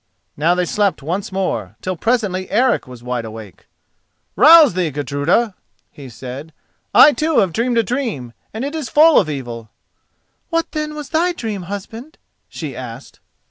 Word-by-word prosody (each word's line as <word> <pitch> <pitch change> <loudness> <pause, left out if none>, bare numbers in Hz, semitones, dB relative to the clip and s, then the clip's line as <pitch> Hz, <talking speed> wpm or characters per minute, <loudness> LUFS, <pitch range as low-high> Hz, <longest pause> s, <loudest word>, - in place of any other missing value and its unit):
Now 165 +4 +2
they 180 0 0
slept 195 -5 0
once 185 +8 -3
more, 115 - -3
till 185 0 -3
presently 200 -3 -1
Eric 245 - +1
was 125 -2 -12
wide 125 -1 -3
awake. 110 -4 -11 0.7
"Rouse 315 - +8
thee, 180 -2 0
Gudruda," 145 - 0 0.4
he 140 -3 -11
said, 130 +7 -9 0.4
"I 295 +2 +8
too 315 0 0
have 185 -4 +2
dreamed 235 +3 0
a 230 - +4
dream, 215 - -3 0.2
and 225 +5 -4
it 285 - -4
is 310 -7 -4
full 315 +2 +6
of 165 - -1
evil." 120 -6 -6 0.8
"What, 330 -1 -1
then, 305 -1 -4
was 300 -2 -7
thy 345 +2 +1
dream, 205 - -5
husband?" 225 +9 -8 0.3
she 145 -6 -7
asked. 125 +1 -9
185 Hz, 160 wpm, -18 LUFS, -, 0.8 s, Rouse